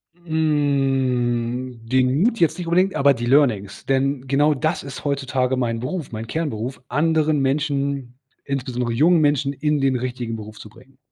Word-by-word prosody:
Hm, 135 Hz, -7 st, 0 dB
den 130 Hz, +5 st, +2 dB
Mut 230 Hz, -1 st, +1 dB
jetzt 165 Hz, 0 st, +2 dB
nicht 175 Hz, -2 st, -5 dB
unbedingt, 185 Hz, +3 st, +2 dB
aber 140 Hz, 0 st, +4 dB
die 120 Hz, -2 st, -4 dB
Learnings. 120 Hz, -7 st, +2 dB
Denn 135 Hz, 0 st, 0 dB
genau 145 Hz, +3 st, +3 dB
das 155 Hz, +4 st, -1 dB
ist 140 Hz, +1 st, -8 dB
heutzutage 135 Hz, -2 st, 0 dB
mein 115 Hz, -3 st, -1 dB
Beruf, 145 Hz, +3 st, -4 dB
mein 110 Hz, 0 st, -6 dB
Kernberuf. 130 Hz, -4 st, -3 dB
Anderen 155 Hz, +2 st, +2 dB
Menschen, 140 Hz, -2 st, -1 dB, 0.2 s
insbesondere 125 Hz, -3 st, -3 dB
jungen 160 Hz, +6 st, +4 dB
Menschen, 145 Hz, -1 st, +1 dB
in 150 Hz, +1 st, 0 dB
den 135 Hz, -1 st, +2 dB
richtigen 125 Hz, -2 st, -3 dB
Beruf 110 Hz, -1 st, -9 dB
zu 105 Hz, -, -11 dB
bringen. 130 Hz, +4 st, -20 dB
135 Hz, 155 wpm, -22 LUFS, 125-150 Hz, 0.2 s, aber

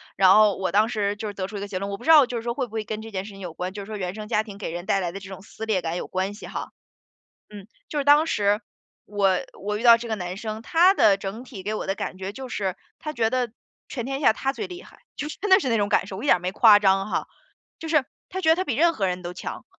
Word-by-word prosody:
然 190 Hz, -1 st, +6 dB
后 210 Hz, -1 st, +5 dB
我 190 Hz, -2 st, -2 dB
当 210 Hz, +4 st, +4 dB
时 205 Hz, -3 st, -1 dB
就 210 Hz, 0 st, -5 dB
得 195 Hz, -1 st, -4 dB
出 210 Hz, -, -7 dB
一 -, -, -4 dB
个 200 Hz, -, -5 dB
结 200 Hz, -2 st, -4 dB
论。 200 Hz, +2 st, -4 dB
我 200 Hz, -, -4 dB
不 240 Hz, -, -13 dB
知 -, -, -2 dB
道 305 Hz, -4 st, +9 dB
就 245 Hz, -1 st, -4 dB
是 225 Hz, -, -5 dB
说 235 Hz, 0 st, -2 dB
会 260 Hz, +1 st, -2 dB
不 235 Hz, -, -18 dB
会 220 Hz, -1 st, -3 dB
跟 215 Hz, 0 st, -5 dB
这 225 Hz, 0 st, -9 dB
件 190 Hz, -1 st, -4 dB
事 210 Hz, -, -9 dB
情 195 Hz, -, -12 dB
有 175 Hz, -3 st, -6 dB
关， 180 Hz, +2 st, -5 dB
就 205 Hz, -, -6 dB
是 195 Hz, -, -9 dB
说 215 Hz, -1 st, -5 dB
原 185 Hz, -1 st, -4 dB
生 215 Hz, -1 st, -7 dB
家 210 Hz, -, +2 dB
庭 210 Hz, -3 st, -10 dB
给 200 Hz, -, -5 dB
人 175 Hz, +1 st, -6 dB
带 195 Hz, -, +1 dB
来 175 Hz, -2 st, -2 dB
的 195 Hz, -, -7 dB
这 200 Hz, -1 st, -11 dB
种 190 Hz, -1 st, -9 dB
撕 215 Hz, +2 st, -8 dB
裂 210 Hz, -4 st, +1 dB
感 165 Hz, +1 st, -3 dB
有 -, -, -5 dB
关 190 Hz, +2 st, -2 dB
系 205 Hz, -, -10 dB
哈。 -, -, -6 dB, 0.8 s
嗯， 205 Hz, -2 st, -10 dB, 0.2 s
就 300 Hz, -, -2 dB
是 285 Hz, -, 0 dB
当 295 Hz, +2 st, +6 dB
时， 205 Hz, -5 st, +1 dB, 0.4 s
我 195 Hz, -3 st, +1 dB, 0.2 s
我 210 Hz, +2 st, -2 dB
遇 215 Hz, -, -5 dB
到 235 Hz, -1 st, +8 dB
这 235 Hz, 0 st, -7 dB
个 220 Hz, -, 0 dB
男 180 Hz, -2 st, -5 dB
生， 215 Hz, 0 st, -5 dB
他 345 Hz, +9 st, +4 dB
的 200 Hz, -, +4 dB
整 200 Hz, +5 st, -6 dB
体 230 Hz, -7 st, -9 dB
给 210 Hz, +3 st, -3 dB
我 -, -, -4 dB
的 195 Hz, -, 0 dB
感 185 Hz, -, -5 dB
觉 190 Hz, +1 st, -5 dB
就 260 Hz, +4 st, -8 dB
是， 195 Hz, -6 st, -2 dB, 0.2 s
他 305 Hz, -, -5 dB
觉 225 Hz, -3 st, +1 dB
得 250 Hz, -2 st, 0 dB, 0.4 s
全 240 Hz, -5 st, -4 dB
天 270 Hz, +2 st, -3 dB
下 250 Hz, -, +4 dB
他 270 Hz, +3 st, -1 dB
最 255 Hz, -, -5 dB
厉 360 Hz, +1 st, -9 dB
害。 -, -, -17 dB, 0.2 s
就 295 Hz, +1 st, -4 dB
是 -, -, -9 dB
真 415 Hz, -, -2 dB
的 380 Hz, -, +8 dB
是 270 Hz, -11 st, -2 dB
那 230 Hz, -, +2 dB
种 205 Hz, -1 st, +1 dB
感 190 Hz, -, +2 dB
受， 190 Hz, -1 st, -7 dB
我 -, -, -7 dB
一 -, -, -3 dB
点 180 Hz, -, +4 dB
没 180 Hz, +1 st, -2 dB
夸 215 Hz, 0 st, +7 dB
张 195 Hz, 0 st, +2 dB
哈， -, -, -2 dB, 0.5 s
就 325 Hz, -, -7 dB
是 305 Hz, -4 st, +3 dB, 0.2 s
他 375 Hz, -, -4 dB
觉 360 Hz, -, -2 dB
得 320 Hz, -, +7 dB
他 370 Hz, -, -1 dB
比 270 Hz, -10 st, -2 dB
任 335 Hz, +5 st, +4 dB
何 200 Hz, -, -1 dB
人 180 Hz, 0 st, -3 dB
都 175 Hz, 0 st, -6 dB
强。 180 Hz, -, -7 dB
210 Hz, 340 characters per minute, -24 LUFS, 195-245 Hz, 0.8 s, 道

